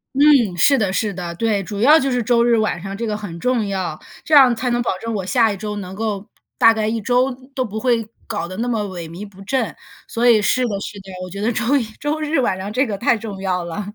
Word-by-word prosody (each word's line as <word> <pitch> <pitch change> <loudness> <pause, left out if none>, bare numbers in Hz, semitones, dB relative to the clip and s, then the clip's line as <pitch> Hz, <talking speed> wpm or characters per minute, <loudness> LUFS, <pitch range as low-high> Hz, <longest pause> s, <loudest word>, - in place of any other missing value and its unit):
嗯， 275 -9 +5
是 275 - +5
的， 205 -6 0
是 205 +1 -1
的。 175 -2 -5
对， 210 +1 0
主 205 +1 -5
要 300 +7 +7
就 275 - 0
是 250 -1 0
周 235 +1 +3
日 240 0 +4
晚 215 -5 0
上 195 +1 -6
这 230 - -3
个 215 -2 -2
很 200 -5 -7
重 245 0 0
要， 185 -5 -3 0.2
这 315 - -3
样 265 -4 +7
才 250 +2 -2
能 240 0 +1
保 230 -6 -1
证 230 0 -4
我 195 -3 -3
下 225 +4 +3
一 200 - -4
周 210 +1 -5
能 190 -2 -6
够 210 -1 -3 0.3
大 225 - +6
概 215 -1 -1
一 225 +1 -1
周 250 +4 +2 0.2
都 265 -2 -1
不 220 -2 -5
会 230 -2 +1 0.2
搞 210 -6 -3
得 185 +1 -8
那 235 +3 -2
么 230 -3 0
萎 180 -4 -6
靡 185 +6 -8
不 195 -1 -16
振。 260 +6 -1 0.3
所 235 +1 0
以， 225 -3 +6
是 250 +4 +2
的 205 -4 -2
是 200 0 -7
的， 190 0 -12
我 185 - -7
觉 200 +3 -6
得 225 +3 +1
周 240 +4 +1
一 265 - 0 0.2
周 295 +2 -2
日 305 0 0
晚 215 -7 +1
上 195 +2 -5
这 255 +5 +1
个 205 -3 -3
太 235 - +2
重 210 -3 -7
要 180 -2 -1
了。 170 +4 -5
215 Hz, 290 characters per minute, -20 LUFS, 195-245 Hz, 0.3 s, 要